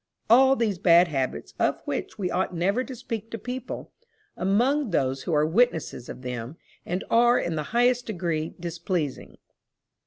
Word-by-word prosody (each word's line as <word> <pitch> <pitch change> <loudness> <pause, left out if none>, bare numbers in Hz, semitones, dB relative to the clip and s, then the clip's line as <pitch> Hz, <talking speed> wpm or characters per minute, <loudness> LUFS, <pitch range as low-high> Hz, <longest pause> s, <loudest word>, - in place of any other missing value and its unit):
all 265 +3 +7
these 215 -7 -1
bad 170 0 +6
habits, 135 -4 -3
of - - +1
which - - -4
we 185 -3 -2
ought 180 0 -1
never 195 +9 +1
to 260 0 -8
speak 225 -2 -6
to 230 - -5
people, 250 +4 -6 0.4
among 240 +9 +1
those 135 -6 0
who 170 - -3
are 150 0 +3
witnesses 165 - +1
of 130 - -8
them, 125 +4 -5 0.3
and 180 +2 -2
are 240 +1 +5
in 170 - -1
the 155 - -1
highest 245 +1 +2
degree 170 -6 -2
displeasing. 170 -3 -3
185 Hz, 160 wpm, -26 LUFS, 160-240 Hz, 0.4 s, all